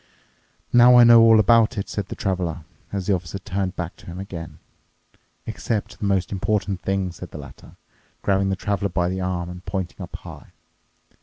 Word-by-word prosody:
"Now 120 Hz, +1 st, +8 dB
I 120 Hz, -, +9 dB
know 115 Hz, -1 st, +8 dB
all 115 Hz, -1 st, +7 dB
about 115 Hz, +2 st, +4 dB
it," 100 Hz, -, -3 dB
said 100 Hz, -2 st, -4 dB
the -, -, -6 dB
Traveler, 90 Hz, -4 st, -2 dB, 0.3 s
as 100 Hz, -2 st, -3 dB
the 100 Hz, -, +2 dB
Officer 90 Hz, 0 st, -3 dB
turned 95 Hz, -1 st, -3 dB
back 85 Hz, -1 st, -5 dB
to -, -, -17 dB
him 85 Hz, +1 st, -7 dB
again. 85 Hz, -4 st, -8 dB, 0.9 s
"Except 105 Hz, -2 st, -4 dB
the -, -, -3 dB
most 95 Hz, -3 st, 0 dB
important 100 Hz, -1 st, -1 dB
thing," 95 Hz, -1 st, -1 dB
said 90 Hz, +1 st, -10 dB
the -, -, -9 dB
latter, 70 Hz, -3 st, -12 dB, 0.5 s
grabbing 95 Hz, 0 st, +1 dB
the 95 Hz, -, 0 dB
Traveler 100 Hz, 0 st, -2 dB
by 90 Hz, 0 st, 0 dB
the 95 Hz, +1 st, -3 dB
arm 90 Hz, -1 st, -2 dB
and 90 Hz, +1 st, -9 dB
pointing 95 Hz, -3 st, -5 dB
up -, -, -8 dB
high. -, -, -11 dB
95 Hz, 185 wpm, -23 LUFS, 90-105 Hz, 0.9 s, I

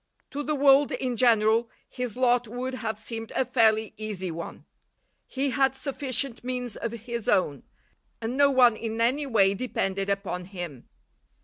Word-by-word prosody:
To 285 Hz, -, -3 dB
the 300 Hz, +1 st, -1 dB
world 280 Hz, 0 st, +5 dB
in 250 Hz, -2 st, -2 dB
general 230 Hz, -1 st, +3 dB, 0.2 s
his 250 Hz, -3 st, -5 dB
lot 245 Hz, -1 st, +3 dB
would 250 Hz, +3 st, -4 dB
have 220 Hz, -4 st, -3 dB
seemed 225 Hz, +1 st, -5 dB
a 260 Hz, -, +2 dB
fairly 220 Hz, -3 st, +2 dB
easy 205 Hz, -4 st, -4 dB
one. 165 Hz, +1 st, -7 dB, 0.6 s
He 270 Hz, +1 st, -1 dB
had 270 Hz, -1 st, +2 dB
sufficient 265 Hz, -2 st, -3 dB
means 250 Hz, -2 st, -3 dB
of 230 Hz, -, -4 dB
his 235 Hz, 0 st, -5 dB
own; 145 Hz, -7 st, +2 dB, 0.6 s
and 230 Hz, +2 st, -3 dB
no 285 Hz, 0 st, +5 dB
one 250 Hz, -4 st, +5 dB
in 225 Hz, 0 st, -4 dB
any 265 Hz, +5 st, +1 dB
way 200 Hz, -6 st, +4 dB
depended 195 Hz, -3 st, -2 dB
upon 195 Hz, -2 st, -2 dB
him. 175 Hz, -9 st, -8 dB
235 Hz, 155 wpm, -27 LUFS, 215-255 Hz, 0.6 s, world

